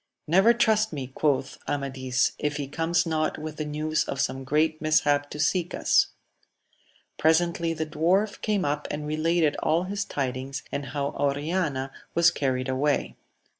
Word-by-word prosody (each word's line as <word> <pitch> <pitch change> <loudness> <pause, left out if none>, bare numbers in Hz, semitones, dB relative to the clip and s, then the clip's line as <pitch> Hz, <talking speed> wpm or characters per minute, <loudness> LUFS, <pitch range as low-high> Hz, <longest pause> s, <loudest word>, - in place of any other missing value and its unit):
Never 190 +8 +5
trust 220 -2 +2
me, 135 -4 -5
quoth 140 -3 0
Amadis, 130 -2 0
if 150 0 -1
he 145 -2 -3
comes 165 +5 0
not 155 -1 0
with 155 0 -6
the 155 - -3
news 155 +1 -1
of 135 - -4
some 135 0 -1
great 155 +3 +1
mishap 145 -2 +2
to 150 - -8
seek 175 +3 +1
us. - - +3 1.1
Presently 165 +1 +2
the 160 0 -2
dwarf 175 +7 +1
came 210 -5 0
up 145 +1 -1
and 150 0 -4
related 155 0 +1
all 165 +3 +2
his 200 +2 -2
tidings, 135 -3 -4
and 140 0 -3
how 140 -1 -2
Oriana 145 -1 -1 0.2
was 170 0 +5
carried 130 -2 -1
away. 135 +2 0
150 Hz, 155 wpm, -26 LUFS, 140-165 Hz, 1.1 s, Never